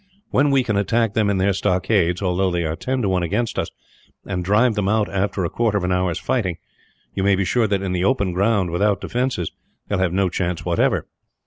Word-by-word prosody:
When 145 +3 +3
we 135 -2 +3
can 105 -4 -1
attack 110 +2 +1
them 105 -1 +2
in 100 - +1
their 95 +1 +2
stockades, 95 -1 +1
although 95 +1 +1
they 85 -1 -1
are 80 0 -2
ten 130 +6 -2
to 100 - +1
one 95 -1 +1
against 105 +7 -1
us, - - -2 0.6
and 90 -2 -3
drive 105 +6 +3
them 105 -2 -1
out 110 0 +2
after 95 -1 -1
a - - -1
quarter 115 -3 +1
of 95 - -2
an 90 - 0
hour's 90 -2 0
fighting; 100 -10 -1 0.6
you 95 - -2
may 100 0 +3
be 95 0 0
sure 115 +3 +2
that 100 -1 0
in 95 - -2
the 90 -1 -1
open 100 -5 +1
ground, 100 -1 +1
without 100 +4 +1
defences, 125 -9 -2 0.4
they 105 - 0
will 95 - -1
have 90 -2 +1
no 95 +1 +1
chance 90 -1 -2
whatever. - - +1
100 Hz, 230 wpm, -21 LUFS, 90-110 Hz, 0.6 s, When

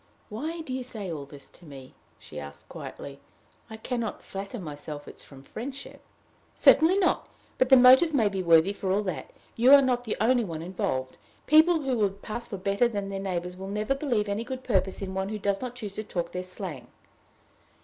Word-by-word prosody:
"Why 310 +10 -4
do 270 -5 -6
you 260 - -2
say 220 -7 -3
all 145 -3 -6
this 140 -1 -11
to - - -19
me?" 135 -4 -12 0.2
she 75 - -10
asked, 70 0 -10
quietly. 140 0 -9 0.5
"I 220 - -8
can 245 +2 -3
not 225 -2 -4
flatter 195 +4 -6
myself 150 -3 -7
it - - -11
is - - -12
from 135 -1 -14
friendship." 265 - -8 0.5
"Certainly 335 +5 +6
not. 390 - +1 0.3
But 255 - +3
the 265 - +9
motive 260 +6 +7
may 245 -8 +3
be 195 -2 -2
worthy, 170 +2 +4
for 190 -2 -3
all 205 +2 +1
that. 185 -5 -4 0.3
You 245 +3 +5
are 285 - +9
not 245 -2 0
the 220 - -3
only 240 +3 +3
one 165 -5 -5
involved. 130 -8 -3 0.3
People 315 +2 +5
who 260 -3 0
would 200 -1 -1
pass 235 +2 -5
for 200 - -5
better 200 +5 +1
than 205 -4 -4
their 195 0 -4
neighbors 180 -2 -3
will 190 +1 -7
never 210 +5 -1
believe 250 -7 -1
any 200 +3 -2
good 260 +1 -6
purpose 195 -4 0
in 190 -1 -5
one 190 +1 -2
who 215 - -3
does 200 -1 -1
not 250 -1 -5
choose 210 -5 -6
to 215 - -4
talk 175 -5 -4
their 180 - -3
slang." 180 -8 -7
200 Hz, 210 wpm, -27 LUFS, 180-245 Hz, 0.5 s, the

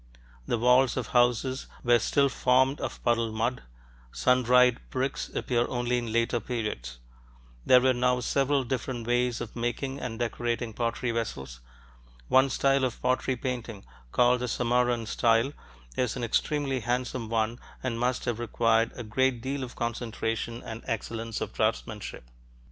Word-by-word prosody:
The - - +1
walls 125 +2 +4
of 130 - -3
houses 125 +2 +2 0.2
were 120 -1 +5
still 140 +4 +2
formed 130 +1 +2
of - - -5
puddled 115 -2 +1
mud; 115 +3 -1 0.5
sun 125 0 +3
dried 125 0 +5
bricks 130 +1 -2
appear 120 -1 0
only 120 0 0
in 120 -2 -5
later 115 +1 +1
periods. 105 - -4 0.7
There 125 - +8
were 130 0 +4
now 125 0 +2
several 140 +2 +1
different 125 -1 -3
ways 120 0 +1
of 120 - -7
making 130 +3 -2
and 115 -3 -5
decorating 120 0 -2
pottery 115 +2 -1
vessels. 65 - -4 0.7
One 130 +1 +5
style 135 0 +2
of 125 -2 -1
pottery 130 +1 +1
painting, 120 -5 -5 0.3
called 125 0 +4
the 125 - -2
Samarran 120 -1 +1
style, 115 +4 +2 0.4
is 125 -3 0
an 125 - -4
extremely 135 +3 0
handsome 125 0 -2
one 115 +1 0 0.2
and 120 -3 -2
must 125 +1 0
have 120 -2 -1
required 115 -1 +2
a 120 - -6
great 130 +3 +1
deal 135 +3 -3
of 125 - -8
concentration 115 0 -3
and 115 0 -7
excellence 115 0 -3
of 110 -2 -4
draftsmanship. 110 - -2
120 Hz, 150 wpm, -28 LUFS, 115-125 Hz, 0.7 s, There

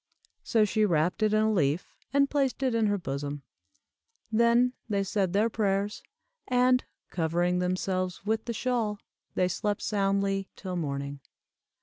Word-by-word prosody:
So 220 -2 +3
she 215 +1 +1
wrapped 175 -1 +1
it 215 -1 +3
in 215 0 +3
a 220 0 +2
leaf, 155 -2 0 0.2
and 280 0 +4
placed 275 -2 0
it 255 -2 +2
in 225 -2 +2
her 205 0 +1
bosom. 145 -3 -4 0.9
Then 235 +2 +4 0.2
they 200 -2 +1
said 195 -1 0
their 205 +4 +3
prayers, 205 -2 -1 0.5
and, 250 0 +3 0.3
covering 175 +2 +1
themselves 185 +1 -1
with 220 +1 0
the 235 - -2
shawl, 225 -2 -1 0.4
they 180 - +2
slept 205 +3 -2
soundly 195 -1 0
till 185 -2 -5
morning. 140 -3 -3
200 Hz, 145 wpm, -28 LUFS, 180-225 Hz, 0.9 s, and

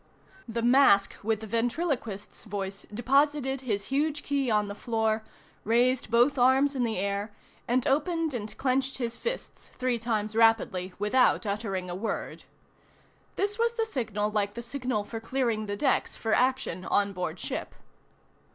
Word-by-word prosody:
The 230 0 -3
mask 240 -6 +5
with 220 0 0
the - - -6
ventriloquist's 235 - -2
voice 195 -2 -5
deposited 270 +3 +1
his 210 -6 -1
huge 295 +1 0
key 280 -3 0
on 210 -2 +2
the 200 - -5
floor, 220 0 0 0.4
raised 245 +2 +2
both 245 +5 +3
arms 265 +3 +4
in 255 - +1
the 225 -3 -1
air, 200 +2 -2 0.4
and 245 +1 +1
opened 320 +2 +1
and 215 -3 -5
clenched 265 0 0
his 235 -2 -2
fists, 485 +1 -5
three 255 -2 0
times 215 -2 -2
rapidly 225 -5 +3
without 220 +4 +3
uttering 200 -3 -2
a 175 - -4
word. 205 +5 -4 0.9
This 410 +2 -1
was 465 0 +2
the 455 -1 0
signal 215 - -2
like 205 -1 -1
the 235 - -5
signal 250 -3 -2
for 225 +2 -6
clearing 225 -2 -1
the 205 0 -3
decks 270 +5 +1
for 220 -1 -1
action 255 -8 +1
on 200 +1 +1
board 180 -1 -3
ship. - - -5
235 Hz, 155 wpm, -28 LUFS, 210-265 Hz, 0.9 s, mask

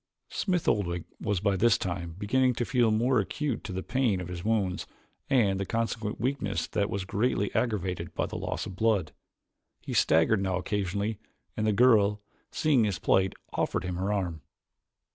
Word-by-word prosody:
Smith 180 -4 -1
Oldwick 85 -5 +1 0.2
was 100 -3 0
by 100 -1 +2
this 115 +3 +4
time 85 -2 -4
beginning 125 +5 +2
to 120 - -1
feel 120 -3 +3
more 115 +3 +3
acutely 105 -2 -3
the 95 - -3
pain 125 -8 +1
of 90 -1 -6
his 90 -1 -6
wounds 105 -5 0 0.4
and 105 -8 +3
the - - 0
consequent 115 -2 -2
weakness 110 -9 -1
that 105 -1 -1
was 95 -1 -3
greatly 100 0 0
aggravated 95 -8 -1
by - - 0
loss - - -3
of 95 - -7
blood. 100 -6 +1 0.7
He - - -6
staggered 80 +6 +4
now 95 -1 0
occasionally 100 +2 -2 0.4
and 110 0 0
the - - +4
girl, 105 -2 +4 0.3
seeing 140 -8 +2
his 100 -3 -1
plight, 95 0 +2 0.2
offered - - -1
him 90 -1 -3
her 95 +3 -1
arm. 90 -6 -2
105 Hz, 165 wpm, -28 LUFS, 95-115 Hz, 0.7 s, this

